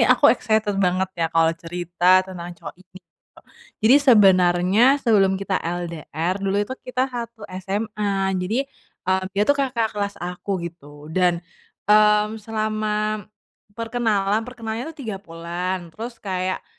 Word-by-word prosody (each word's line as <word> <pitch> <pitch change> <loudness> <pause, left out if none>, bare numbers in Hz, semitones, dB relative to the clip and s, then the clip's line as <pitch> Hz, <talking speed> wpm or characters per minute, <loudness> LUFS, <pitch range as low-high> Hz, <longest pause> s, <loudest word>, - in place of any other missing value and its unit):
aku - - +4
excited 215 -1 0
banget 185 0 +1
ya 165 - +3
kalau 165 0 +3
cerita 175 +2 +2
tentang 175 -2 -8
cowok - - -9
ini 185 0 -19
tuh, 165 - -72 0.7
jadi 240 - +7
sebenarnya 185 -1 +5 0.2
sebelum 195 -4 +4
kita 195 -1 -2
LDR 170 0 -3
dulu 195 0 0
itu 255 - -7 0.2
kita 255 +1 +1
satu 235 -2 -6 0.2
SMA 200 -1 -1
jadi, 220 +9 -1 0.4
eee, 190 +1 +1
dia 205 - +4
itu 285 - +4
kakak 250 -6 -1
kelas 200 -1 -3
aku 180 0 -4
gitu 145 -1 -13
dan, 175 -1 +1 0.4
mmm, 210 +1 +4
selama 215 -1 -2 0.5
perkenalan 225 -3 0
perkenalannya 230 +1 -5
itu 325 - -10
3 215 -3 -3
bulan 175 0 -5
terus 230 +5 -7
kayak, 185 -3 -3
195 Hz, 135 wpm, -22 LUFS, 180-215 Hz, 0.7 s, jadi